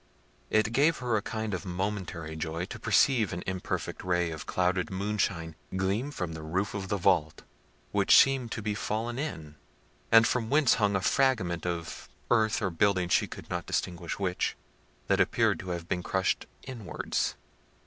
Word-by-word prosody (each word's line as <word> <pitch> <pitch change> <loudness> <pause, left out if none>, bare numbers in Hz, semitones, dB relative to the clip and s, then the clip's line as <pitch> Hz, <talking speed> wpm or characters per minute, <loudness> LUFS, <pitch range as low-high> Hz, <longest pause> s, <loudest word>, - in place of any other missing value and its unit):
It 110 0 +2
gave 150 +5 +4
her 125 -3 -1
a 105 - +1
kind 110 0 -3
of 90 -3 -3
momentary 90 -4 -4
joy 80 +2 -3
to - - -8
perceive 120 -8 +3
an 85 - -4
imperfect 95 -1 -3
ray 90 -2 +1
of 80 -2 -7
clouded 90 0 0
moonshine 95 -4 -2 0.2
gleam 100 +8 0
from 90 - -4
the 80 - -7
roof 90 +6 -2
of 95 -1 -4
the 100 - 0
vault, 85 -5 +1 0.5
which - - +5
seemed 135 -4 +4
to 110 - -5
be 105 0 -1
fallen 115 +4 -2
in, 80 - -5 0.5
and 115 0 +8
from 115 -2 0
whence 145 -1 +5
hung 100 -1 +3
a 95 - +1
fragment 95 -10 +1
of 85 -1 -4 0.2
earth 110 -1 +3
or 95 - 0
building, 90 +1 +2
she - - +3
could - - -10
not - - -3
distinguish 85 -1 -2
which, 95 -2 -1 0.5
that - - +3
appeared - - +2
to 95 - -7
have 85 -1 -4
been 90 - -1
crushed 95 +1 0 0.2
inwards. 120 -7 -3
95 Hz, 170 wpm, -29 LUFS, 85-110 Hz, 0.5 s, and